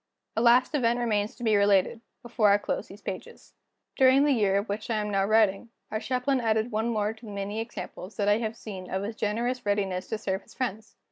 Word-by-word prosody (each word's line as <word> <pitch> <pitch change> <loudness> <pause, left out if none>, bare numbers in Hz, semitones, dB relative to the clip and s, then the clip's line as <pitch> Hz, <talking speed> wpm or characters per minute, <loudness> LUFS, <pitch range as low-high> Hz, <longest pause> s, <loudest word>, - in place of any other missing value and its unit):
A 225 - +1
last 245 +4 +5
event 240 -4 +2
remains 215 -3 0
to 245 - -10
be 220 -2 +3
related, 200 +2 +3 0.2
before 230 -3 +2
I 200 - +6
close - - -3
these 200 +1 -14
pages. 185 - -8 0.4
During 265 +1 +5
the 295 - +3
year 205 -6 +2
of 200 +3 -1
which 210 +3 -4
I 230 - +1
am 210 -1 -1
now 195 -1 +2
writing, 215 +1 +2 0.2
our 215 - -1
Chaplain 255 +2 0
added 220 +1 +1
one 220 +2 0
more 215 -2 0
to 225 +1 -15
the - - -7
many 200 +2 -4
examples 225 -3 -7
that 205 -2 0
I 205 +1 +4
have 220 -1 -3
seen 190 -5 -8
of 190 +1 -2
his 215 +2 -4
generous 235 +4 -1
readiness 195 -3 -1
to 220 - -2
serve 190 -1 -2
his - - -19
friends. 220 -4 -4
215 Hz, 225 wpm, -27 LUFS, 200-235 Hz, 0.4 s, I